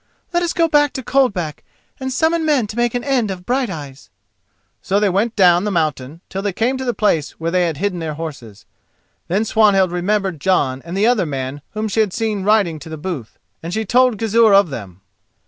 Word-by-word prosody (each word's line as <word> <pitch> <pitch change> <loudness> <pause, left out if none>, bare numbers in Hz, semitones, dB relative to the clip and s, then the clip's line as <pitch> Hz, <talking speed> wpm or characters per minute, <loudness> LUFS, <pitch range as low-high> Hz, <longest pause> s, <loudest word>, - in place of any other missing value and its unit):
Let 345 - +2
us 345 -1 0
go 335 -1 +2
back 290 -2 +3
to 260 - -5
Coldback 210 - 0 0.4
and 260 0 -3
summon 320 +5 +1
men 295 -7 +2
to 210 - -8
make 240 0 0
an 245 - -2
end 255 -6 0
of 180 -2 -6
Brighteyes." 160 - -3 0.7
So 195 +2 +1
they 205 -1 +2
went 205 +5 0
on - - -48
down 180 -2 +5
the 210 - -1
mountain 155 -4 -2
till 195 - -4
they 200 -1 -2
came 240 +7 0
to - - -3
the 245 -3 -1
place 165 -8 +1
where 165 +1 -2
they 180 -1 +2
had 160 -3 -3
hidden 185 +1 -2
their 160 -2 -4
horses. 120 -10 -8 0.6
Then 195 +6 0
Swanhild 205 -5 +3
remembered 185 -2 -1
Jon 135 -8 +1
and 170 +3 -5
the 205 - +3
other 230 -7 +2
man 135 0 -4
whom 215 +1 -1
she 215 - -2
had 210 -4 +2
seen 220 -3 -1
riding 195 -6 +2
to 165 - -11
the 160 - -6
booth, 150 - -6 0.2
and 165 - -6
she 220 0 -1
told 250 +1 +3
Gizur 225 -1 +4
of 195 -6 +4
them. 100 -7 -8
195 Hz, 215 wpm, -19 LUFS, 165-230 Hz, 0.7 s, down